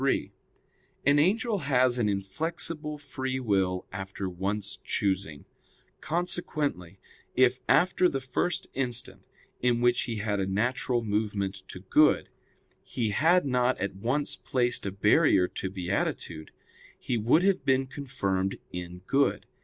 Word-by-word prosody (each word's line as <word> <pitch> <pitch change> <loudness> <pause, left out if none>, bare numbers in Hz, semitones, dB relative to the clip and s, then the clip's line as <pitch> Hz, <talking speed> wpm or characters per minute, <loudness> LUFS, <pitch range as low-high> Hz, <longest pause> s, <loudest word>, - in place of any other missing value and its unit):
3: 135 - +1 0.7
An 145 +1 +5
angel 210 +6 +2
has 130 -4 +2
an 105 -3 +2
inflexible 150 - -2
free 130 -2 -4
will 95 -6 0
after 95 +1 -5
once 95 +2 -3
choosing; 95 -7 -1 0.5
consequently, 150 - -2 0.4
if 130 0 +4
after 180 0 +4
the 135 - -2
first 165 +7 -2
instant, 125 -3 -3 0.4
in 120 -1 +2
which 120 0 +2
he 115 - -3
had 105 -1 -1
a 95 - 0
natural 120 +4 0
movement 105 -2 -1
to - - -8
good, - - +3 0.5
he 115 -4 -2
had 165 - +3
not 125 -1 +2
at 100 +1 -2
once 125 +9 0
placed 120 -4 0
a - - -2
barrier 95 -1 +4
to 95 - -4
beatitude, 90 -4 -3 0.5
he 125 - -2
would 120 +10 +3
have 195 -1 +2
been 135 0 +2
confirmed 100 -9 -2
in 90 0 -7
good. 140 +5 +1
120 Hz, 130 wpm, -28 LUFS, 95-140 Hz, 0.7 s, An